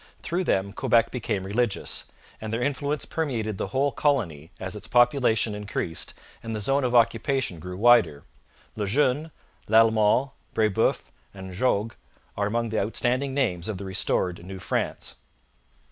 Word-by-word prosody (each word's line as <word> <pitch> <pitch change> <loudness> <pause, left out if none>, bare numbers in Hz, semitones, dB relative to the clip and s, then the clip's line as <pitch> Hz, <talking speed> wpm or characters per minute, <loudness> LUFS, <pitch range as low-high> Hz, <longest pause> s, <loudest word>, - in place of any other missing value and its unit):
Through 180 +2 -1
them 100 -4 0
Quebec 115 -1 +2
became 105 -6 -2
religious, 105 +2 -1 0.3
and 110 0 -5
their 115 +2 -1
influence 145 +2 -1
permeated 115 -10 -2
the - - -2
whole 135 +7 +1
colony 90 - 0
as 95 +1 -5
its 105 - -8
population 120 -4 +3
increased 100 -5 -4 0.3
and 115 -1 -5
the - - -2
zone 135 +7 +1
of 125 -1 0
occupation 115 - +2
grew 90 +2 -7
wider. 110 -10 +4 0.5
Le 105 -2 -2
Jeune, 145 +6 +1 0.4
Lalemant, 110 +4 +4 0.2
Brebeuf, 110 -3 +1 0.2
and 95 -1 -8
Jogues 110 +1 0 0.4
are 100 0 0
among 115 +2 -1
the 110 - 0
outstanding 125 +6 0
names 105 -10 0
of 105 - -3
the 100 - -7
restored 90 -2 -1
New 95 +2 -8
France. 95 - -3
110 Hz, 145 wpm, -26 LUFS, 100-130 Hz, 0.5 s, wider